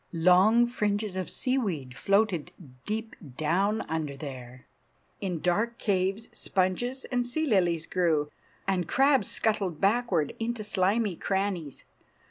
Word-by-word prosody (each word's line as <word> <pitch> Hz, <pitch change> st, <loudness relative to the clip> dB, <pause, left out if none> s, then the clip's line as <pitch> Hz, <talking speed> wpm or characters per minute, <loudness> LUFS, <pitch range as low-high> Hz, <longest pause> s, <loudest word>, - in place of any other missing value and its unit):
Long 185 Hz, +8 st, +5 dB
fringes 210 Hz, -4 st, -1 dB
of 185 Hz, -1 st, -3 dB
seaweed 190 Hz, -, -1 dB
floated 195 Hz, -4 st, +1 dB, 0.4 s
deep 220 Hz, +1 st, -3 dB, 0.2 s
down 195 Hz, +8 st, +1 dB
under 155 Hz, -3 st, -3 dB
there. 130 Hz, -3 st, -9 dB, 0.5 s
In 180 Hz, -5 st, -3 dB
dark 210 Hz, +7 st, 0 dB
caves 195 Hz, +2 st, 0 dB
sponges 220 Hz, +8 st, -1 dB
and 245 Hz, -1 st, +1 dB
sea 280 Hz, +6 st, -1 dB
lilies 175 Hz, -, +2 dB
grew, 160 Hz, -5 st, +1 dB, 0.4 s
and 180 Hz, -4 st, 0 dB
crabs 270 Hz, -3 st, +3 dB
scuttled 195 Hz, -7 st, 0 dB
backward 195 Hz, -, +1 dB
into 230 Hz, -1 st, -2 dB
slimy 205 Hz, 0 st, +1 dB
crannies. 190 Hz, -6 st, -2 dB
195 Hz, 115 wpm, -28 LUFS, 170-225 Hz, 0.5 s, Long